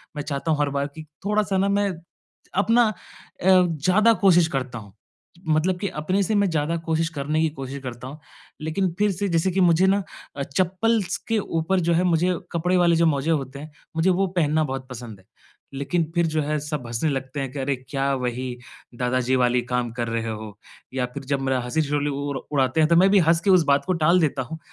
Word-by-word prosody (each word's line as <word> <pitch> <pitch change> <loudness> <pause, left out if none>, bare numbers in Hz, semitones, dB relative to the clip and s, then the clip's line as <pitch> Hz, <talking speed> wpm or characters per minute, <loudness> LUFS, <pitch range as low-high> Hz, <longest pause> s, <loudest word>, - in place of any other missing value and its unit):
मैं 145 - -3
चाहता 145 +3 -2
हूँ 150 - +1
हर 145 -1 +1
बार 140 0 -1
कि 155 - -8 0.2
थोड़ा-सा 205 -2 +1
ना 195 +1 +2
मैं 200 0 +1 0.7
अपना 235 +3 +4
अ, - - -4 0.5
ज़्यादा 185 +4 +4
कोशिश 175 -4 +5
करता 130 -4 -4
हूँ, 100 -2 -14 0.5
मतलब 160 +4 +2
कि 200 - -2
अपने 185 +4 -1
से 215 +3 0
मैं 200 -2 +3
ज़्यादा 160 +1 0
कोशिश 165 0 0
करने 150 +1 -1
की 160 - +2
कोशिश 135 -1 -7
करता 125 0 -7
हूँ। 150 +4 -9 0.4
लेकिन 165 +4 -1
फिर 210 -1 +3
से 195 +2 -2
जैसे 170 +2 +1
कि 190 +1 +1
मुझे 175 +2 +4
ना 200 0 +2 0.3
अ, 140 - -3
चप्पल्स 185 +6 0
के 225 -1 +2
ऊपर 165 +1 -1
जो 170 0 +1
है 175 +2 +2
मुझे 180 +1 +2 0.2
कपड़े 180 +2 +1
वाले 170 -1 +4
जो 165 0 +3
मोज़े 150 +1 +1
होते 140 -2 -2
हैं, 155 +1 -9 0.2
मुझे 165 +3 +2
वो 190 +1 +2
पहनना 160 -3 +1
बहुत 130 -2 -4
पसंद 115 -5 -9
है। 95 - -23 0.5
लेकिन 140 +5 -1
फिर 170 -1 +3
जो 155 -1 0
है 150 +1 -1
सब 150 -4 -5
हँसने 120 +7 -1
लगते 135 +1 -4
हैं 135 -2 -3
कि 140 - -6
अरे, 135 +1 0
क्या 140 0 0
वही 125 0 -3 0.4
दादाजी 125 +1 +1
वाली 125 0 +2
काम 125 -1 -2
कर 120 -1 -3
रहे 115 0 -2
हो? 110 -1 -7 0.4
या 130 -2 0
फिर 140 - -6
जब 140 0 -1
मेरा 130 -1 0
हँसी-ठिठोली 145 +2 0
उ 140 -1 -3
उड़ाते 135 +1 +1
हैं 155 - +5
तो 170 - +5
मैं 190 +2 +6
भी 200 - +6
हँस 165 0 +4
के 200 - 0
उस 180 -3 +6
बात 140 0 +2
को 185 - +1
टाल 175 +3 +5
देता 140 -3 0
हूँ। 160 +6 -8
155 Hz, 220 wpm, -23 LUFS, 135-180 Hz, 0.7 s, मैं